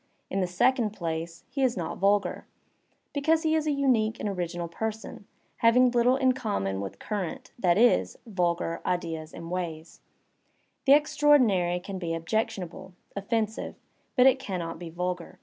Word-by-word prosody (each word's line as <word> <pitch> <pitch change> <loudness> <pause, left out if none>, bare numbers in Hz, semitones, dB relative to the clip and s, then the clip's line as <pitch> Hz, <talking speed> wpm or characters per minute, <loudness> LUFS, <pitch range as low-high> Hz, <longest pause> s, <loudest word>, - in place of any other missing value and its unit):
In 195 - 0
the 185 - +1
second 215 +4 +2
place, 165 -2 -4
he 270 +2 -4
is 255 -4 +2
not 170 -1 -4
vulgar, 200 +1 +1 0.7
because 315 +3 +2
he 315 -1 +2
is 310 -1 +1
a - - +2
unique 245 -6 +1
and - - -2
original 175 -3 -3
person, 220 +3 -5 0.3
having 245 +2 +5
little 245 +1 +4
in 260 -1 +3
common 150 - -2
With 100 - -6
current, 200 -6 -4
that 180 -4 +3
is, 240 +2 +3
vulgar, 175 -5 -1
ideas 165 -3 -3
and 165 0 -8
ways; 165 -3 -5
I - - -44
the 275 - +9
extraordinary 255 -12 +4
can 190 +1 -6
be 165 -2 -2
objectionable, 185 0 -3 0.2
offensive, 215 +2 -2 0.4
but 255 -1 +5
it 265 0 +5
can 190 -8 -4
inot 165 -1 -5
be 175 -2 -7
vulgar. 180 +1 -4
195 Hz, 160 wpm, -27 LUFS, 170-245 Hz, 0.7 s, the